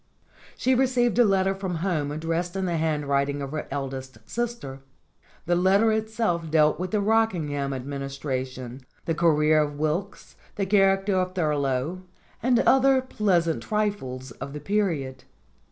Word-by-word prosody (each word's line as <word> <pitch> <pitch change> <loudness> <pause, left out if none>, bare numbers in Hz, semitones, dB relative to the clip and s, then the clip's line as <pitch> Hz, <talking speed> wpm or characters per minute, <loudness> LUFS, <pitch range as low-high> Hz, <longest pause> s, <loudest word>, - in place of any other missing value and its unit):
She 260 - +2
received 245 -2 +2
a - - +8
letter 195 -2 +2
from 190 -2 -4
home 155 -6 -1
addressed 165 +4 -2
in 190 -1 -1
the 170 -2 -1
hand 155 -2 0
writing 140 0 0
of 140 -1 -5
her 155 0 -4
eldest 135 -2 -5
sister. 230 - -4 0.7
The 175 - +1
letter 195 +5 +4
itself 215 -6 -1
dealt 155 0 +3
with 185 +1 -2
the 215 - 0
Rockingham 180 -10 +1
Administration, 135 -1 -5 0.2
the 165 - 0
career 155 -2 +3
of 145 -1 -3
Wilkes, 160 +7 -3 0.2
the 200 - -1
character 195 0 +3
of 185 0 -1
Thurlow, 150 0 -1 0.4
and 245 0 +3
other 270 0 +4
pleasant 185 -10 0
trifles 200 - -2
of 135 +4 -8
the 150 - -5
period. 160 -7 -1
170 Hz, 145 wpm, -25 LUFS, 140-200 Hz, 0.7 s, a